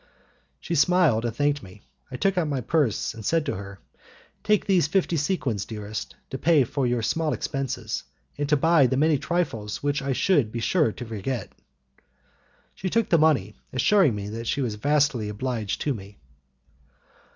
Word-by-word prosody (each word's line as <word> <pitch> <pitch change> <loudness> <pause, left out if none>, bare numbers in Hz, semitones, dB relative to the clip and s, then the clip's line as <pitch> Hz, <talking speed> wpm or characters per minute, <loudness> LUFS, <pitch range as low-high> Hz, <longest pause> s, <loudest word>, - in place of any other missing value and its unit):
She 170 - -5
smiled 150 -7 +3
and 115 -1 -2
thanked 145 +2 +1
me. 95 0 -14 0.3
I 130 - -7
took 195 +7 +1
out 175 -3 +1
my 140 -3 -1
purse, 140 -2 0
and 110 -1 -9
said 165 +6 +1
to - - -1
her; 100 +1 -8 0.7
"Take 210 -1 +2
these 180 -7 +3
fifty 180 0 +1
sequins, 140 - -1
dearest, 105 0 -6 0.2
to 135 - -4
pay 160 -3 +4
for 125 - -6
all - - +2
your 120 -2 0
small 160 +5 0
expenses, 135 -5 -3 0.3
and 145 0 -3
to 150 - +4
buy 160 -2 +4
the 130 - 0
many 150 0 +3
trifles 120 -14 -2
which 145 0 0
I 135 0 -1
should 140 - +2
be 115 - -4
sure 150 +2 +2
to 125 - -8
forget." 115 +3 -4 1.2
She 185 - -4
took 230 +2 +1
the 170 - +4
money, 135 -11 +3 0.2
assuring 145 - +3
me 100 -1 -5
that 115 +2 -6
she 140 - 0
was 120 -5 -1
vastly 140 -1 +1
obliged 110 -1 -3
to 145 - 0
me. 100 -2 -10
135 Hz, 180 wpm, -25 LUFS, 110-160 Hz, 1.2 s, pay